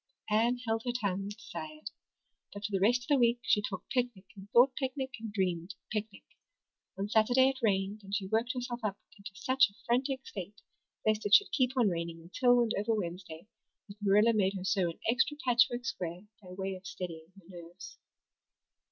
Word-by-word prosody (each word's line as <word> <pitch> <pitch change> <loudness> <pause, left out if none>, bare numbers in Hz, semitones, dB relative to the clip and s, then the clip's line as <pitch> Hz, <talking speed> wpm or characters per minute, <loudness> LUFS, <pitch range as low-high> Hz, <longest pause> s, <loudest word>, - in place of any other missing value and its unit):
Anne 230 +3 +3
held 225 0 0
her 245 - -1
tongue 200 -5 -2
as 205 - -6
desired. 310 +5 -8 0.6
But 205 0 -7
for 210 - -3
the 195 - +1
rest 240 +5 +3
of - - -13
the 285 -2 +4
week 235 0 +4
she 210 - +3
talked 195 -2 -6
picnic 245 -7 -1
and 195 0 -12
thought 250 +4 +5
picnic 265 0 -3
and 225 -1 -6
dreamed 185 -2 -2 0.2
picnic. 215 -1 -4 0.7
On 195 +1 -2
Saturday 245 +5 +4
it 270 -1 -4
rained 200 -1 0
and 195 +1 -4
she 200 -2 -1
worked 225 +5 0
herself 245 -1 -4
up 205 -2 -1 0.2
into 200 0 -10
such 255 +2 +3
a 200 - -23
frantic 260 +2 0
state 200 +1 -8 0.5
lest 215 -1 +2
it 205 - +8
should 410 -2 +4
keep 260 -6 +1
on 240 -4 +4
raining 170 -1 -4
until 245 +9 +3
and 230 -2 +1
over 220 +2 +1
Wednesday 175 -3 -5 0.4
that 205 +1 -13
Marilla 210 +3 +4
made 200 -2 +1
her 185 -1 -5
sew 190 -2 +2
an 165 - -9
extra 260 +5 +2
patchwork 245 0 +3
square 175 -7 -4 0.2
by 185 - -13
way 190 +1 -4
of 190 +1 -9
steadying 165 -3 -7
her 195 - -17
nerves. 175 0 -11
210 Hz, 195 wpm, -31 LUFS, 190-245 Hz, 0.7 s, it